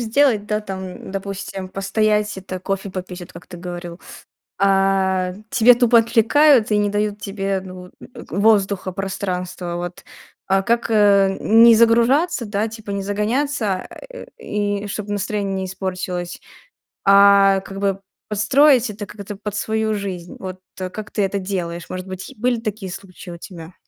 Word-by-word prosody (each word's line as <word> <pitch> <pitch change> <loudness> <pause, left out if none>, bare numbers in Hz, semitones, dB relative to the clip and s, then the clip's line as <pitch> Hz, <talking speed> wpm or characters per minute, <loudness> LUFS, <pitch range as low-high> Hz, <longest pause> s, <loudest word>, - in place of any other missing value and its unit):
сделать, 230 -2 +2
да, 210 0 -1
там, 190 -3 -7
допустим, 195 -1 -5
постоять 210 +2 0
это 185 -1 -7
кофе 195 +1 -3
попить, 185 -1 -6
от 175 - -12
как 170 - -12
ты 180 - -10
говорил. 175 0 -7 0.6
А 195 -1 +2 0.2
тебя 245 +1 +6
тупо 240 -1 +5
отвлекают 230 +3 +4
и 210 - +3
не 205 0 +2
дают 205 0 -1
тебе, 195 -1 -2
ну, 185 -1 -9
э, - - -20 0.4
воздуха, 200 -2 +2
пространства, 180 -2 -4
вот. 175 0 -6 0.4
А 195 0 +2
как, 235 +2 0
э, 205 -3 +5
н 225 +2 +5
не 235 -1 +9
загружаться, 235 +6 +3
да, 205 +1 -1
типа 220 -2 -9
не 200 0 -2
загоняться, 215 +3 0
а, 185 - -6 0.2
э, - - -9
и 205 - -2
чтобы 205 0 -5
настроение 205 -1 -2
не 190 0 -2
испортилось, 185 -1 -4 0.6
а, 200 0 +6
как 195 0 -9
бы 195 -1 0 0.3
подстроить 250 +4 +4
это 210 0 -6
как-то 205 0 -8
под 210 0 -6
свою 220 0 -1
жизнь? 185 -4 -6
Вот, 185 -1 -7 0.2
э, 185 0 -3
как 210 +3 -8
ты 210 - 0
это 195 +1 -1
делаешь? 175 -3 -4
Может 185 0 -6
быть, 185 +7 -7
е 270 - -14
были 245 +1 +1
такие 210 -4 -4
случаи 185 -1 -10
у 170 - -8
тебя? 170 -1 -10
200 Hz, 165 wpm, -20 LUFS, 190-215 Hz, 0.6 s, не